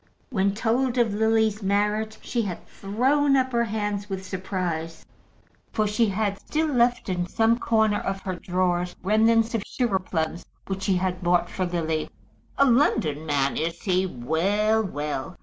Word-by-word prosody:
When 195 -3 +1
told 245 +3 0
of 230 -4 +2
Lily's 220 0 +2
marriage, 210 +2 0
she 240 - -1
had 190 -6 -5
thrown 270 +8 +1
up 260 0 +1
her 235 -1 +2
hands 205 -2 -3
with 190 -1 -4
surprise, 180 -4 -4 0.7
for 215 - +1
she 215 +2 +2
had 200 0 -1
still 315 +1 -1
left 245 0 +2
in 180 -2 -1
some 225 +5 +2
corner 220 -3 +2
of 195 0 -3
her 185 - -3
drawers 180 0 -1
remnants 225 +3 +3
of 225 - 0
sugar 230 -6 0
plums 170 -2 -3 0.2
which 195 0 -4
she 190 0 +1
had 180 0 -1
bought 175 0 +2
for 185 -1 -1
Lily. 160 -3 -2 0.5
"A 275 - +5
London 160 - +2
man 140 -2 +1
is 165 +1 -3
he? 185 -1 +1
Well, 190 - +1
well. 150 -1 -4
200 Hz, 160 wpm, -25 LUFS, 180-225 Hz, 0.7 s, A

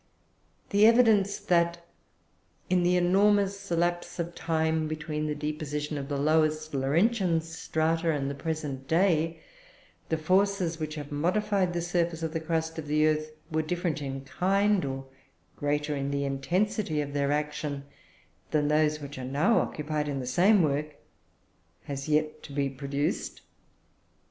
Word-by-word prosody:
The 205 +1 +6
evidence 220 -4 +4
that, 170 -1 +1 0.9
in 180 -1 +4
the 180 +1 +3
enormous 200 +2 +2
lapse 175 +1 -1
of 170 0 -3
time 160 -1 0
between 155 0 -3
the 150 - -2
deposition 150 0 -3
of 140 -1 -5
the 145 - -1
lowest 155 +1 +1
Laurentian 170 - +2
strata 165 0 -1
and 145 -3 0
the 140 - -2
present 140 -3 -4
day, 165 -1 +2 0.7
the 160 - +1
forces 185 0 +1
which 155 -1 -4
have 145 -1 -7
modified 185 +4 +1
the 170 -1 -2
surface 170 -1 -1
of 160 -1 -2
the 165 - -1
crust 160 0 -2
of 150 - -7
the 155 +1 +3
earth 155 0 +1 0.2
were 160 0 +1
different 170 -1 -2
in 135 -1 -4
kind, 195 +7 +1
or 135 0 -4 0.5
greater 145 +1 -1
in 140 0 -2
the 140 0 -1
intensity 160 +5 0
of 145 -1 -3
their 140 0 +1
action, 150 -1 -2 0.7
than 150 -1 +1
those 150 0 +2
which 140 -1 -7
are - - -5
now 145 - +2
occupied 150 0 -2
in 140 -1 -2
the 130 - -4
same 180 - +4
work, 150 0 -1 0.9
has 140 +1 -5
yet 155 0 +1
to - - -11
be 140 -1 -1
produced. 140 +4 -3
155 Hz, 150 wpm, -28 LUFS, 145-175 Hz, 0.9 s, The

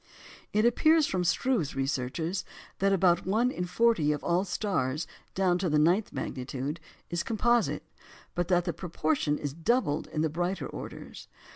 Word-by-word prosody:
It 215 +2 +2
appears 310 +6 +4
from 185 -6 -1
Struve's 180 - +1
researches 135 +6 -2 0.4
that 195 +1 +3
about 180 -2 +3
one 230 +6 +2
in 180 - -3
forty 180 -4 +2
of 150 - -3
all 175 +2 +2
stars 170 -8 -1 0.3
down 185 -2 +2
to 180 -1 0
the 150 - +2
ninth 175 +8 +3
magnitude 135 +4 -4 0.3
is 175 0 0
composite, 235 +2 +1 0.5
but 175 -1 -1
that 175 -1 +2
the 170 - -1
proportion 175 - -1
is 145 -2 -4
doubled 165 - 0
in 155 - -2
the 160 - +2
brighter 175 +4 -2
orders. - - -8
175 Hz, 155 wpm, -29 LUFS, 150-205 Hz, 0.5 s, appears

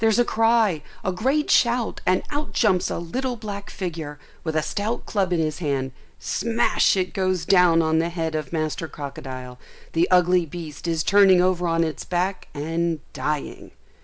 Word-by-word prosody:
There's 225 -1 +3
a 240 - +4
cry, 225 -8 +2 0.2
a 190 - +1
great 265 +11 0
shout, 240 -1 +2
and 185 0 +3
out 290 +1 -3
jumps 190 -6 +2
a - - -2
little 250 +10 -3
black 205 -3 -7
figure, 160 -5 -5 0.3
with 160 -2 -3
a 155 - +2
stout 205 +9 -3
club 195 -4 0
in 175 - +1
his 155 0 -1
hand: 135 -5 -1 0.3
smash 230 -2 +1
it 185 -1 -1
goes 185 -3 0
down 180 -4 +5
on 160 0 +2
the 165 +1 0
head 165 -2 -3
of 155 -4 -3
master 155 0 -2
crocodile; 130 -3 -8 0.3
the 165 +2 +3
ugly 180 -1 +4
beast 160 0 -7
is 165 -2 0
turning 195 -1 +6
over 180 -1 +2
on 165 0 +2
its 155 -3 -3
back 185 +2 -2
and 165 +2 -1
dying. 150 -1 -4
175 Hz, 175 wpm, -23 LUFS, 160-200 Hz, 0.3 s, turning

